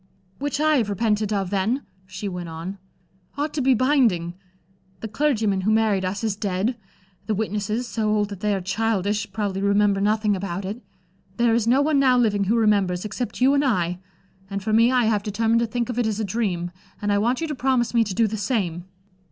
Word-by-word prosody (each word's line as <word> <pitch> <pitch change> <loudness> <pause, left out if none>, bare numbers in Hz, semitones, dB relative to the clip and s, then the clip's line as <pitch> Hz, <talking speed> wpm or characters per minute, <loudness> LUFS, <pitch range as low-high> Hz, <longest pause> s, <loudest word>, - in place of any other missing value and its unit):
"Which 285 0 -2
I 310 0 +3
have 225 -5 0
repented 210 0 0
of, 195 -3 -1
then," 215 +8 0 0.2
she 190 +2 -6
went 180 -3 -5
on, 170 +5 -7 0.6
"ought 295 +1 -2
to 300 - -1
be 260 0 +4
binding. 230 - +2 0.7
The 225 - -4
clergyman 220 -6 0
who 195 - 0
married 215 -3 +2
us 185 +4 -3
is 215 -3 0
dead; 200 +4 -1 0.5
the 215 - 0
witnesses, 210 +3 -2
so 220 -2 -1
old 210 -1 +1
that 200 -3 -7
they 210 0 0
are 190 - -3
childish, 210 +1 -1
probably 200 -3 -2
remember 200 0 +2
nothing 210 0 +2
about 190 0 -4
it. 210 +6 -5 0.6
There 235 -1 +3
is 230 -1 +1
no 260 +4 +4
one 300 -1 +2
now 260 -2 +4
living 205 -4 +2
who 215 +5 +2
remembers, 200 -5 +2
except 240 +4 -4
you 265 +2 +5
and 285 0 +3
I. 180 -9 0 0.5
And 200 -1 -4
for 215 +1 -1
me 230 +3 +5
I 250 -2 +3
have 215 -2 +2
determined 220 +3 +1
to 235 - 0
think 235 +1 -2
of 245 -1 -3
it 235 - +1
as 215 -1 -2
a 220 - -1
dream, 185 -5 -2 0.3
and 205 0 -1
I 200 - +2
want 240 +4 +1
you 330 - -1
to 305 - -3
promise 255 -3 0
me 230 -1 +4
to 195 -3 -4
do 230 - +3
the 220 0 -2
same." 190 -6 -2
215 Hz, 215 wpm, -23 LUFS, 195-235 Hz, 0.7 s, you